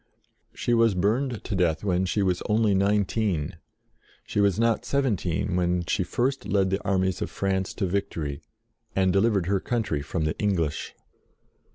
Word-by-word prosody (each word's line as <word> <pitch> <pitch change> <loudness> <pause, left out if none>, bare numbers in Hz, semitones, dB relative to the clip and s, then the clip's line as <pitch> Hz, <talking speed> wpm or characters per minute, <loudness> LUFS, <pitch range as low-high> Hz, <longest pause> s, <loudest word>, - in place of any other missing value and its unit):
She 120 - 0
was 115 -3 +4
burned 115 +6 0
to - - -4
death 85 -3 +1
when 95 -2 +1
she 100 +2 +1
was 90 -2 0
only 105 -1 +3
nineteen: 100 -4 +1 0.7
she - - -2
was 100 -3 +3
not 115 0 +2
seven 135 -5 +1
teen 90 +2 -2
when 90 -1 +1
she 95 - 0
first 135 +7 -1
led 95 -2 +2
the 95 - -1
armies 95 -2 0
of - - -2
France 95 -1 -1
to 100 - -1
victory, 80 -7 -3 0.5
and 95 -1 +3
delivered 100 -2 +2
her 100 +2 +1
country 105 -10 -1
from 80 +3 -3
the 75 0 -1
English. 90 -8 -1
95 Hz, 165 wpm, -26 LUFS, 90-105 Hz, 0.7 s, was